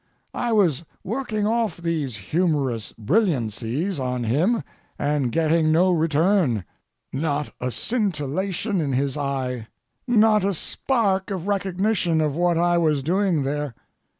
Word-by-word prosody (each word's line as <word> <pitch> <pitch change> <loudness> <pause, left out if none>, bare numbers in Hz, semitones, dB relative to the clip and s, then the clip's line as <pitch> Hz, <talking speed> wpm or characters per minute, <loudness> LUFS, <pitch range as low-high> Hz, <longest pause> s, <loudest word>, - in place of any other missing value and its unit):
I 240 - -1
was 175 - +2 0.2
working 215 0 -2
off 225 -4 0
these 165 -7 -2
humorous 135 - -1
brilliancies 140 - 0
on 125 -1 -2
him 155 - +1 0.3
and 145 -4 0
getting 160 +1 +2
no 180 +4 +4
return—not 150 - -1
a 125 - -1
scintillation 190 - -1
in 140 -3 -1
his 135 +1 0
eye, 130 -5 -3 0.4
not 220 -3 +4
a 195 -1 +1
spark 195 - 0
of 190 -2 -4
recognition 195 -3 +1
of 150 -2 0
what 175 0 +2
I 175 0 +3
was 155 -4 +1
doing 180 -1 +1
there. 145 -2 -3
165 Hz, 125 wpm, -23 LUFS, 140-195 Hz, 0.4 s, no